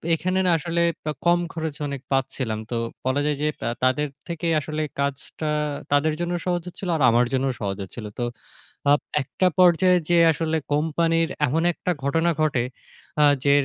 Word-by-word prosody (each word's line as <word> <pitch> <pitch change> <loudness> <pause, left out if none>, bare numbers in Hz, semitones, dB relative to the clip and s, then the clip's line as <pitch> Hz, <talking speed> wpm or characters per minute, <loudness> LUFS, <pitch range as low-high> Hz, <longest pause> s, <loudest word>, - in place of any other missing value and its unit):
এখানে 185 +3 -1
না 180 - +4
আসলে 170 +1 -1 0.2
বা 155 - 0
কম 175 0 +5
খরচ 160 -3 -3
অনেক 140 -2 -5
পাচ্ছিলাম। 130 -4 -1
তো - - -1 0.3
বলা 130 +2 +1
যায় 150 -1 +1
যে, 150 - +2 0.2
আ - - +1
তাদের 130 +4 +2 0.2
থেকে 170 -1 -3
আসলে 155 +1 -4 0.2
কাজটা 140 +2 -2 0.4
তাদের 145 +2 +3
জন্যও 175 0 -1
সহজ 175 -1 0
হচ্ছিল 180 +1 -6
আর 150 - -4
আমার 120 +2 +4
জন্যও 130 0 +1
সহজ 100 -2 -2
হচ্ছিল। 105 +4 -8
তো 120 - 0 0.7
আপ 145 - +4 0.2
একটা 185 +7 -1
পর্যায়ে 180 0 +5
যেয়ে 170 -1 +5
আসলে 160 0 -1 0.2
কোম্পানির 165 +2 +1 0.2
এমন 160 +5 0
একটা 180 - -3
ঘটনা 165 +4 +2
ঘটে 140 -6 +2 0.6
আ - - +7 0.2
যে, 140 - +4
155 Hz, 170 wpm, -24 LUFS, 135-170 Hz, 0.7 s, আ